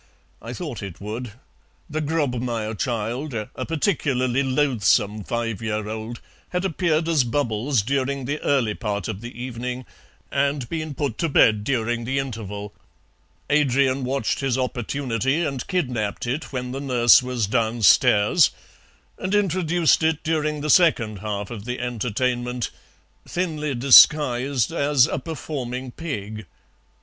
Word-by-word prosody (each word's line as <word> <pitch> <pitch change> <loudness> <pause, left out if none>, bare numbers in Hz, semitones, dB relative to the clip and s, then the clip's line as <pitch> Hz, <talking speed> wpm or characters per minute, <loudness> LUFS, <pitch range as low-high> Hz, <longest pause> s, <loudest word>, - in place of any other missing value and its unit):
I 115 - -7
thought 150 -7 -6
it 95 -4 -8
would. 110 +3 -6 0.5
The 155 +1 -3
Grobmayer 125 -8 -1
child, 120 +5 -3
a 105 -2 -5
particularly 140 -6 0
loathsome 120 -6 +1
five 115 -1 -3
year 110 -1 -2
old, 110 +2 -6 0.3
had 180 +1 -2
appeared 165 -2 0
as 160 -5 +3
'Bubbles' 120 -1 0
during 135 +2 -1
the 145 +4 -3
early 125 -7 +1
part 105 -4 -3
of 105 -2 -5
the 120 0 -9
evening, 125 0 -5 0.5
and 140 -2 0
been 155 -1 -4
put 140 -6 -3
to 165 - 0
bed 110 -6 +4
during 120 -1 -1
the 135 +3 -1
interval. 105 -6 -5 0.8
Adrian 140 -2 +2
watched 130 -1 -1
his 135 -2 0
opportunity 130 +3 -1
and 135 -4 -4
kidnapped 125 - -2
it 135 +7 -3
when 125 -2 -4
the 135 +2 -4
nurse 125 -2 +5
was 125 -3 -1
downstairs, 110 -2 +4 0.7
and 190 +2 -1
introduced 175 -5 +2
it 160 -1 +1
during 155 -2 -1
the 150 0 +1
second 115 - +3
half 105 +1 -4
of 110 -3 -7
the 125 +1 -4
entertainment, 125 +1 -2 0.6
thinly 155 -5 -2
disguised 130 0 +5
as 145 -5 +3
a - - -2
performing 130 -4 -5
pig. 110 - -6
125 Hz, 135 wpm, -23 LUFS, 115-145 Hz, 0.8 s, nurse